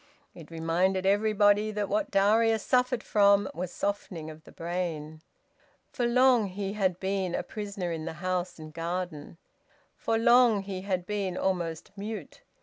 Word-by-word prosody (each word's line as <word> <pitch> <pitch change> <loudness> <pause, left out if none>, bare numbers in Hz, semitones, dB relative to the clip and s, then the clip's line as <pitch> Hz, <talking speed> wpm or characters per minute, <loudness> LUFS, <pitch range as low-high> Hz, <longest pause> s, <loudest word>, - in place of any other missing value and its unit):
It 160 -3 -12
reminded 175 +4 0
everybody 205 +1 +3
that 210 -1 -2
what 315 +8 -1
Darius 220 +2 +3
suffered 250 -2 +1
from 200 -1 +4
was 175 +2 -4
softening 185 -6 -4
of 155 0 -14
the - - -14
brain. 165 -3 -4 0.7
For 240 - 0
long 250 -2 +4
he 195 +1 -4
had 190 -4 0
been 190 -2 -1
a - - -2
prisoner 200 -4 -5
in 160 -1 -4
the 165 - -4
house 180 +2 -3
and 155 -1 -10
garden. 170 -2 -4 0.6
For 225 - -1
long 235 -3 +5
he 190 -1 -5
had 185 -2 -2
been 195 -2 -2
almost 170 -4 -2
mute. 205 -5 -7
195 Hz, 150 wpm, -28 LUFS, 175-210 Hz, 0.7 s, long